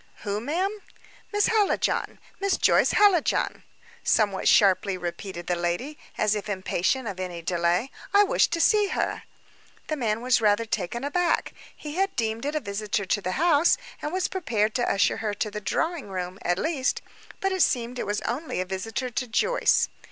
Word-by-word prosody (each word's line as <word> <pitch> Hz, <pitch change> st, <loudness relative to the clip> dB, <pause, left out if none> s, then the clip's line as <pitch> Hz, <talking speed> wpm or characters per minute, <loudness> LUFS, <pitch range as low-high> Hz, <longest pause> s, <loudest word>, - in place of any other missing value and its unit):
"Who, 205 Hz, 0 st, -2 dB
ma'am?" 370 Hz, -, -1 dB, 0.5 s
"Miss 415 Hz, -1 st, +2 dB
Hallijohn; 435 Hz, -3 st, +1 dB, 0.2 s
Miss 395 Hz, -1 st, +1 dB
Joyce -, -, +4 dB
Hallijohn," 400 Hz, -6 st, +3 dB, 0.4 s
somewhat 205 Hz, -4 st, +1 dB
sharply 195 Hz, -1 st, +4 dB
repeated 175 Hz, 0 st, -6 dB
the 175 Hz, -, 0 dB
lady, 175 Hz, -, -2 dB, 0.2 s
as 215 Hz, -1 st, +2 dB
if 210 Hz, 0 st, -4 dB
impatient 200 Hz, +5 st, -1 dB
of 195 Hz, -3 st, -5 dB
any 175 Hz, -2 st, -5 dB
delay. 175 Hz, +7 st, 0 dB, 0.2 s
"I 405 Hz, 0 st, +6 dB
wish 405 Hz, -, +3 dB
to 335 Hz, -, -2 dB
see 415 Hz, +4 st, +4 dB
her." -, -, -2 dB, 0.7 s
The 310 Hz, -, 0 dB
man 225 Hz, -5 st, -1 dB
was 245 Hz, -1 st, +2 dB
rather 210 Hz, +1 st, +3 dB
taken 225 Hz, +3 st, -3 dB
aback. 345 Hz, +5 st, 0 dB, 0.2 s
He 300 Hz, +2 st, -7 dB
had 390 Hz, 0 st, 0 dB
deemed 225 Hz, +1 st, -2 dB
it 295 Hz, -, -2 dB
a -, -, +2 dB
visitor 210 Hz, -2 st, -2 dB
to 205 Hz, +2 st, 0 dB
the 185 Hz, -1 st, -2 dB
house, 330 Hz, -, +4 dB, 0.2 s
and 300 Hz, -, -3 dB
was 370 Hz, +1 st, 0 dB
prepared 220 Hz, -, -1 dB
to 245 Hz, 0 st, 0 dB
usher 200 Hz, -, +2 dB
her 210 Hz, -2 st, -2 dB
to 210 Hz, +1 st, -2 dB
the 210 Hz, 0 st, -5 dB
drawing 325 Hz, -, -2 dB
room, 185 Hz, 0 st, -5 dB
at 175 Hz, 0 st, 0 dB
least; 280 Hz, -, -1 dB, 0.4 s
but 390 Hz, -2 st, 0 dB
it 375 Hz, -1 st, 0 dB
seemed 245 Hz, -3 st, +1 dB
it -, -, -3 dB
was 205 Hz, +1 st, -1 dB
only 265 Hz, -, -3 dB
a 185 Hz, -, -1 dB
visitor 225 Hz, +7 st, -4 dB
to 250 Hz, +2 st, -2 dB
Joyce. 480 Hz, -, +2 dB
225 Hz, 180 wpm, -26 LUFS, 195-315 Hz, 0.7 s, I